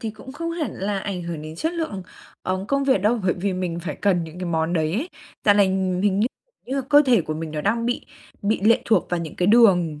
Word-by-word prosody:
thì 225 - -3
cũng 240 +5 -12
không 335 +3 -4
hẳn 325 -8 -2
là 195 +1 -2
ảnh 190 -3 -4
hưởng 170 -3 -5
đến 155 +1 -8
chất 320 - -1
lượng, 315 - -3 0.4
ờ, 185 +1 -2
công 275 0 +1
việc 260 -8 +3
đâu 225 +3 +2
bởi 180 - +2
vì 195 +2 -2
mình 180 -2 -3
phải 170 - -5
cần 180 -4 +1
những 160 +2 -10
cái 185 - -4
món 165 0 0
đấy 160 -2 0
ấy. 265 - -2 0.4
Dạo 205 - +6
này 200 -1 +5 0.4
hình 200 -1 +2
như 220 - +3 0.4
như 265 - -2
là 275 - +1
cơ 290 0 +7
thể 240 -5 +5
của 155 -1 -4
mình 160 0 -5
nó 150 0 -3
đang 230 +6 0
bị 245 - -2 0.4
bị 205 -1 +1
lệ 230 +2 +4
thuộc 225 - +2
vào 175 - 0
những 160 -2 -7
cái 180 - +1
đường, 180 -9 +4
195 Hz, 265 wpm, -23 LUFS, 170-230 Hz, 0.4 s, cơ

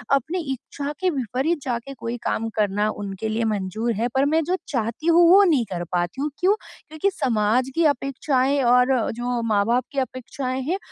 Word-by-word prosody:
अपनी 315 +7 -1
इच्छा 280 +3 -6
के 370 - +2
विपरीत 270 - -1
जाके 245 +1 -3
कोई 235 -2 -5
काम 225 +1 -1
करना 205 +1 +1
उनके 205 0 -5
लिए 220 +2 -1
मंज़ूर 210 +4 -2
है। 225 +4 0
पर 270 +1 +3
मैं 325 0 +3
जो 360 +4 0
चाहती 235 +4 -3
हूँ 340 +1 +6
वो 395 +2 +8
नहीं 300 -11 +3
कर 175 -1 -3
पाती 175 +7 -1
हूँ। 295 - 0
क्यूँ? 380 +3 +4 0.3
क्योंकि 315 +6 0
समाज 235 +1 +1
की 335 - +3
अपेक्षाएँ 275 +1 0
और 250 +2 +4 0.2
जो 240 +1 -2
माँ-बाप 230 +2 +1
की 280 - -1
अपेक्षाएँ 255 +1 -4
हैं 370 - +1
250 Hz, 180 wpm, -23 LUFS, 225-285 Hz, 0.3 s, वो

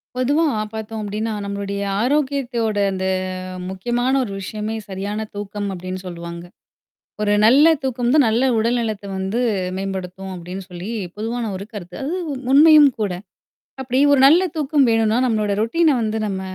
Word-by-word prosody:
பொதுவா 285 +6 +2 0.3
பார்த்தோம் 220 0 -5
அப்படின்னா, 215 +2 -3
நம்மளுடைய 200 0 -4 0.2
ஆரோக்கியத்தோட 255 -5 0
அந்த 190 0 -3 0.6
முக்கியமான 240 +7 -1
ஒரு 220 - -5
விஷயமே 215 +3 -4
சரியான 205 +3 -4
தூக்கம் 205 0 -4
அப்படின்னு 185 +1 -5
சொல்லுவாங்க. 170 -1 -7 0.8
ஒரு 205 -1 +2
நல்ல 275 +8 +7 0.2
தூக்கம் 245 -2 0
தான், 295 -3 +5
நல்ல 225 +3 +2
உடல்நலத்த 225 -2 -1
வந்து 190 +5 -2 0.4
மேம்படுத்தும் 190 0 -5
அப்படின்னு 180 +2 -7
சொல்லி 180 +3 -7 0.3
பொதுவான 225 +1 -3
ஒரு 190 +1 -6
கருத்து. 180 -4 -8
அது 290 +5 -2 0.4
உண்மையும் 300 0 +8
கூட. 205 -3 0 0.7
அப்படி 260 0 -1
ஒரு 280 - +4
நல்ல 330 +6 +6
தூக்கம் 295 -2 +2
வேணும்னா, 225 0 +2
நம்மளோட 215 -3 0
ரொட்டீன்ன 305 +5 +2
வந்து 220 0 -1
நம்ம 195 -2 -3
220 Hz, 140 wpm, -20 LUFS, 195-255 Hz, 0.8 s, உண்மையும்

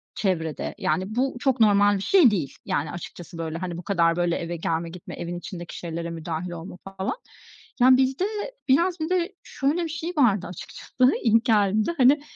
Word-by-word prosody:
çevrede, 165 -6 -2
yani, 185 +7 -1
bu 260 +1 0
çok 265 -2 +1
normal 205 -1 +5
bir - - -5
şey 340 - +6
değil, 155 -9 -2
yani, 145 - -1
açıkçası, 175 0 -9
böyle, 165 -1 -4
hani, 175 -1 -4
bu 180 - -7
kadar 170 -3 +2
böyle 175 0 +1
eve 170 +1 -4
gelme, 165 0 -2
gitme 180 +1 -9
evin 175 +1 -5
içindeki 175 -1 -8
şeylere 170 0 -4
müdahil 165 +1 -4
olma 175 +1 -8 0.2
falan. 190 - -2 0.7
Yani, 255 +1 +7
bizde 265 +7 +1 0.4
biraz 340 +6 +3
bir 315 +2 -2
de 370 +1 0
şöyle 295 +6 -1
bir 330 - -3
şey 325 +3 -4
vardı 210 -9 +3
açıkçası, 250 - 0
ilk 230 0 +4
geldiğimde, 215 - +3
hani, 275 +2 +5
195 Hz, 180 wpm, -25 LUFS, 170-260 Hz, 0.7 s, Yani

